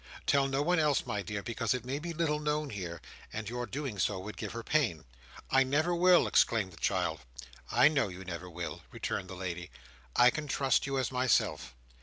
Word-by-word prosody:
Tell 140 -1 +3
no 135 +1 0
one 175 +2 +2
else, 150 -3 +2
my 105 - -2
dear, 100 +1 -4
because 115 +2 -1
it 125 -2 -5
may 135 +3 -2
be 170 +2 -5
little 155 -2 0
known 150 -1 -1
here, 85 -5 -6 0.3
and 110 -1 -5
your 120 +2 -3
doing 135 -8 -4
so 95 +2 +1
would 100 +3 -7
give - - -5
her 115 0 -5
pain." 115 - +1 0.5
"I 135 - +5
never 145 +6 +2
will!" 180 +1 +5
exclaimed 105 -6 +2
the - - -15
child. 90 -5 0 0.5
"I - - +6
know 145 -7 +2
you 95 0 -9
never 90 0 -6
will," 85 -1 -6
returned 95 - -3
the 95 - -7
lady. 90 -1 -5 0.5
"I 120 +1 +7
can 150 +2 -4
trust 135 -1 +2
you 135 -1 -1
as 130 - 0
myself. 125 - +1
120 Hz, 205 wpm, -31 LUFS, 95-145 Hz, 0.5 s, I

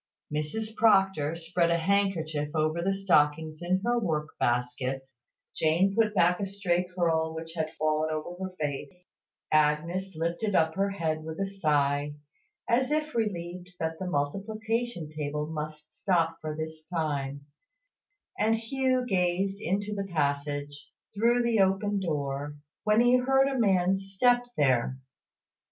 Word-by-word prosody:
Mrs 215 +9 -3
Proctor 195 -8 +3
spread 170 +1 0
a 170 - +3
handkerchief 165 -5 0
over 155 +2 +1
the 190 +3 +1
stockings 155 -5 +2
in 185 +2 +1
her 240 0 +2
work 160 -7 -1
basket; 125 +2 -1 0.5
Jane 170 +5 +2
put 215 -2 +2
back 180 -1 +4
a 200 - -1
stray 185 -2 0
curl 160 -2 +1
which 165 0 -6
had 160 -1 -3
fallen 155 0 +1
over 175 +4 -4
her 185 -1 -8
face; 150 +4 -4 0.5
Agnes 160 +5 +1
lifted 170 +6 -1
up 160 0 +3
her 195 +2 +1
head 160 -5 -2
with 160 +2 -6
a 195 - +1
sigh, 145 -6 0 0.5
as 255 +2 +2
if 305 0 -1
relieved 180 -4 -3
that 160 0 -2
the 190 - -3
multiplication 210 +5 -2
table 150 0 -2
must 150 -1 -6
stop 165 -3 +1
for 155 -1 -4
this 160 0 -6
time; 140 -4 -2 0.9
and 220 +1 +3
Hugh 255 +2 0
gazed 195 -1 0
into 200 +3 -1
the 195 -2 -4
passage, 145 -1 -2 0.2
through 235 +3 +3
the 235 -2 +2
open 195 +1 +2
door, 145 -4 -2 0.3
when 215 +2 +4
he 245 +1 +5
heard 270 +2 +3
a 270 -2 -1
man's 195 -2 +2
step 245 +3 +4 0.2
there. 130 -2 +2
175 Hz, 140 wpm, -28 LUFS, 155-200 Hz, 0.9 s, he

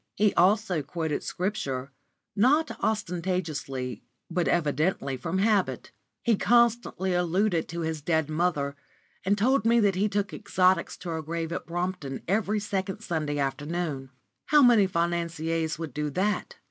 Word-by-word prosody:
He 210 -1 +3
also 190 -2 +3
quoted 160 0 -3
Scripture, 140 -9 -3 0.4
not 285 +9 +3
ostentatiously, 165 - -2 0.3
but 175 0 0
evidently 150 -3 +1
from 130 +9 -3
habit. 205 0 +1 0.3
He 230 -4 +3
constantly 235 -6 +2
alluded 175 0 +1
to 170 +1 -5
his 160 -1 -3
dead 160 0 +1
mother, 155 -3 0 0.5
and 200 +2 +2
told 260 +6 +3
me 235 +1 +4
that 200 -2 +3
he 200 +3 +1
took 205 0 -1
exotics 185 -1 +1
to 180 - -7
her 160 -1 -2
grave 165 +1 -4
at 170 - -4
Brompton 175 -5 -3
every 210 +2 +1
second 200 -1 -3
Sunday 155 -7 -2
afternoon. 145 0 -2 0.4
How 295 -1 +6
many 230 -6 +6
financiers 170 -2 -1
would 160 -2 -6
do 150 0 -2
that? 190 +8 -1
175 Hz, 140 wpm, -27 LUFS, 155-205 Hz, 0.5 s, How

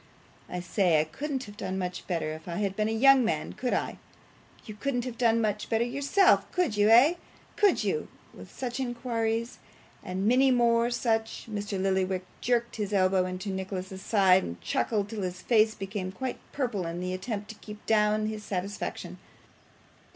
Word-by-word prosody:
I 180 - -4
say, 175 -2 +2
I - - +3
couldn't 265 - -4
have 205 -2 -11
done 190 0 -3
much 180 -1 -4
better 165 -4 -1
if 160 +2 -10
I 170 - -4
had 195 0 -1
been 215 +1 0
a - - -1
young 265 +3 +6
man, 155 -8 -1
could 250 - -1
I? - - -3 0.7
You 215 - -7
couldn't 245 +2 -2
have 250 -2 -5
done 230 -1 +3
much 210 -2 -1
better 225 0 +2
yourself, 280 +10 +3
could 350 - 0
you 205 +1 +4
eh 245 +8 +7 0.4
could 410 -2 +3
you?' 455 - -1 0.3
With - - -12
such 250 0 -4
inquires, 235 -2 -2 0.4
and 190 +2 -2
many 260 +3 +5
more 235 -1 +3
such, 225 -2 -1
Mr. 205 -2 -4
Lillyvick 190 -1 0 0.2
jerked 235 -1 0
his 210 -1 -3
elbow 185 -1 +3
into 185 +2 -5
Nicholas's 190 0 -5
side, 190 -4 +4
and 85 +1 -6
chuckled 200 - -1
till 215 -1 -5
his 180 -1 -4
face 220 -2 +3
became 195 -1 -4
quite 260 +6 -4
purple 235 -10 -2
in 170 +1 -4
the 180 0 -3
attempt 205 +2 -4
to 220 - -7
keep 210 -1 -10
down 215 0 +2
his 215 -1 -4
satisfaction. 200 0 -4
210 Hz, 180 wpm, -28 LUFS, 190-235 Hz, 0.7 s, eh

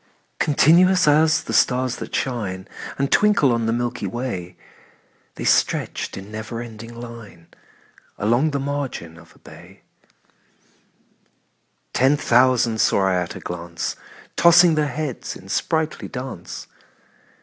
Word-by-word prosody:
Continuous 175 +5 +4
as 155 +1 +4
the 115 - -5
stars 125 +3 +2
that - - -6
shine 100 -8 -3 0.3
And 140 0 -1
twinkle 205 -11 +4
on 115 -1 0
the - - +1
milky 120 +1 -2
way, 120 -8 -5 0.8
The - - -6
stretched - - 0
in 95 +2 -9
never 110 +2 -6
ending 115 0 -9
line 115 -8 -11 0.7
Along 120 +9 +2
the 140 -2 -2
margin 135 - -4
of 85 - -18
a - - -21
bay: - - -15 2.1
Ten 135 +3 +3
thousand 120 -3 +3
saw 95 - +3
I - - +1
at 90 -1 -2
a - - -7
glance, 85 -1 -5 0.4
Tossing 170 0 +6
their 155 -1 +1
heads 150 -4 -4
in 95 - -13
sprightly 160 - -1
dance. 125 -8 -7
120 Hz, 125 wpm, -22 LUFS, 110-145 Hz, 2.1 s, Tossing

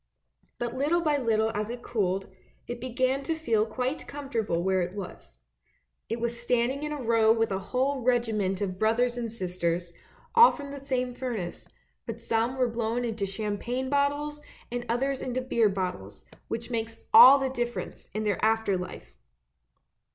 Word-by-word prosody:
But 240 -1 -3
little 300 +6 +1
by 300 -3 +2
little 220 -3 +1
as 210 +1 -2
it 240 0 -6
cooled, 195 -4 -1 0.4
it 240 -1 -6
began 255 +2 0
to 325 +3 -2
feel 230 -9 +1
quite 255 +6 -3
comfortable 230 -11 -2
where 190 0 +2
it 175 +2 -3
was. 125 - -8 0.7
It 230 +2 -2
was 235 0 -3
standing 245 +3 +1
in 300 0 -3
a 300 - -3
row 225 -3 +4
with 225 -1 +2
a 190 - 0
whole 265 +1 0
regiment 225 -6 +1
of 185 -2 -3
brothers 235 +3 +2
and 235 -2 -3
sisters, 175 -4 -2 0.4
all 470 +1 +9
from 285 -2 -7
the 280 - -6
same 255 -2 -2
furnace, 230 -9 -5 0.4
but 230 0 -5
some 230 +2 0
were 255 -1 +3
blown 230 +1 -1
into 220 -4 -2
champagne 220 +6 -3
bottles, 290 +1 0 0.3
and 245 0 -4
others 265 +3 0
into 255 0 -2
beer 235 -4 +2
bottles, 180 - -4 0.2
which 230 +2 -4
makes 225 -1 -3 0.2
all 270 +3 +11
the 270 -1 -1
difference 240 -2 -4
in 215 - -1
their 205 -3 -1
after 220 -3 +2
life! - - -8
235 Hz, 165 wpm, -28 LUFS, 210-260 Hz, 0.7 s, all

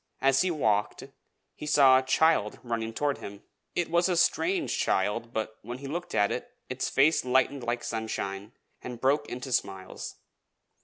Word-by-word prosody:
As 135 0 +3
he 185 - +1
walked, 110 -11 0 0.5
he 150 - -8
saw 135 -3 +6
a - - -2
child 130 -4 +2
running 115 -2 -3
toward 145 +4 -1
him; 100 0 -9 0.3
it 175 - 0
was 170 +2 +3
a 180 - +1
strange 345 - +1
child, 105 +4 0
but 110 -1 -4
when 120 +3 -7
he 140 - -10
looked 170 +6 -5
at 100 +1 +3
it, 125 - -4 0.2
its 130 0 -2
face 145 +4 +3
lightened 130 +2 +1
like 120 0 -2
sunshine, 110 -2 -4 0.3
and 125 -2 -7
broke 145 +3 +1
into 125 +2 -6
smiles. 95 -5 -3
130 Hz, 165 wpm, -28 LUFS, 110-145 Hz, 0.5 s, saw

